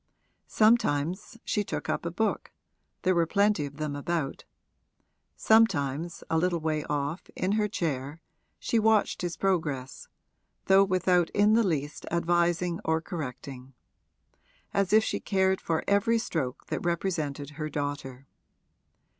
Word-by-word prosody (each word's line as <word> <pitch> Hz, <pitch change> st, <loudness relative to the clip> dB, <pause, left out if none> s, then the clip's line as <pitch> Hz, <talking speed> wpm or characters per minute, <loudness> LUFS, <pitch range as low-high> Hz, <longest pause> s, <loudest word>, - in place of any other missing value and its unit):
Sometimes 210 Hz, -3 st, +2 dB
she 210 Hz, -, 0 dB
took -, -, -5 dB
up -, -, -2 dB
a -, -, -1 dB
book 220 Hz, +6 st, -1 dB, 0.5 s
there 185 Hz, 0 st, +3 dB
were 170 Hz, -2 st, +2 dB
plenty 200 Hz, -5 st, +2 dB
of 140 Hz, +1 st, -13 dB
them 155 Hz, -2 st, -3 dB
about; 145 Hz, -1 st, -3 dB, 0.9 s
sometimes, 170 Hz, -8 st, +2 dB
a 160 Hz, -, +1 dB
little 175 Hz, 0 st, +1 dB
way 155 Hz, -1 st, -1 dB
off, 145 Hz, +3 st, -3 dB
in 185 Hz, -, -1 dB
her 210 Hz, 0 st, +2 dB
chair, 150 Hz, -5 st, -3 dB, 0.4 s
she 230 Hz, -, 0 dB
watched 220 Hz, -1 st, +2 dB
his 175 Hz, -2 st, -3 dB
progress 150 Hz, -9 st, -2 dB, 0.6 s
(though 195 Hz, +1 st, +6 dB
without 185 Hz, -2 st, +2 dB
in 210 Hz, +1 st, +4 dB
the 230 Hz, -, +5 dB
least 150 Hz, -8 st, -2 dB
advising 175 Hz, 0 st, +1 dB
or 160 Hz, 0 st, +1 dB
correcting), 135 Hz, -6 st, -7 dB, 1.0 s
as 200 Hz, -2 st, +1 dB
if 215 Hz, +1 st, +6 dB
she -, -, -2 dB
cared 190 Hz, -1 st, +1 dB
for 160 Hz, -1 st, -1 dB
every 225 Hz, +3 st, +3 dB
stroke 160 Hz, -, -3 dB
that -, -, -4 dB
represented 155 Hz, -5 st, -2 dB
her 155 Hz, +1 st, -5 dB
daughter. 145 Hz, -3 st, -4 dB
170 Hz, 135 wpm, -28 LUFS, 145-195 Hz, 1.0 s, though